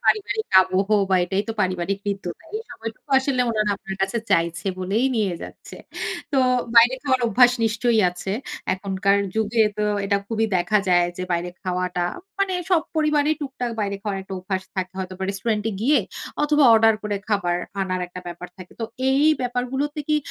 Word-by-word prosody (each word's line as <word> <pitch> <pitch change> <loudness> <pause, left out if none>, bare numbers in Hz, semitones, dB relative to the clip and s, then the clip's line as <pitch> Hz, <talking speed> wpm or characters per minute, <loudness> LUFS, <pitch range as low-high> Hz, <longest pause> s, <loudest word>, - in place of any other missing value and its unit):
পারিবারিক 435 +1 +1 0.2
আবহ 185 +2 0 0.2
বা 190 - +5
এটাই 195 +3 -1
তো - - -1
পারিবারিক 185 +1 0
হৃদ্যতা। 195 - -4
এই - - -4
সময়টুকু 225 +5 -8
আসলে 265 -1 0
ওনারা 215 -2 +1
আপনার 195 -1 -7
কাছে 195 +5 0
চাইছে 170 +1 +1
বলেই 200 +8 +1
নিয়ে 200 -5 +1
যাচ্ছে। - - -10 0.6
তো 275 - +3 0.4
বাইরে 240 +3 +8
খাওয়ার 260 -3 +1
অভ্যাস 245 +3 +5
নিশ্চয়ই 225 +1 +2
আছে। 180 +2 -5 0.4
এখনকার 195 +1 +1 0.2
যুগে 220 +1 +2 0.2
তো 210 - +1 0.2
এটা 200 0 +2
খুবই 225 0 0
দেখা 195 +4 +2
যায় 175 -1 +4
যে, 185 - -4
বাইরে 175 +1 -1
খাওয়াটা 180 -1 -1 0.3
মানে 395 -1 +1 0.2
সব 340 -3 +4
পরিবারেই 305 0 +2
টুকটাক 265 -4 -4
বাইরে 200 -1 -1
খাওয়ার 205 -2 -2
একটা 190 - -7
অভ্যাস 190 0 -3
থাকে 185 0 -2
হয়তো 185 0 -4
বা 190 - -2
রেস্টুরেন্ট 210 +2 -2
এ - - -5
গিয়ে 270 +2 +4 0.4
অথবা 295 -1 +4
অর্ডার 225 0 +5
করে 205 -1 -2
খাবার 180 -5 +1 0.2
আনার 185 -1 -1
একটা 180 +1 -9
ব্যাপার 175 +1 -7
থাকে। 185 -1 -12
তো - - 0 0.3
এই 275 +2 +3 0.2
ব্যাপারগুলোতে 255 +4 -2
কি 305 - +3
210 Hz, 175 wpm, -23 LUFS, 185-250 Hz, 0.6 s, বাইরে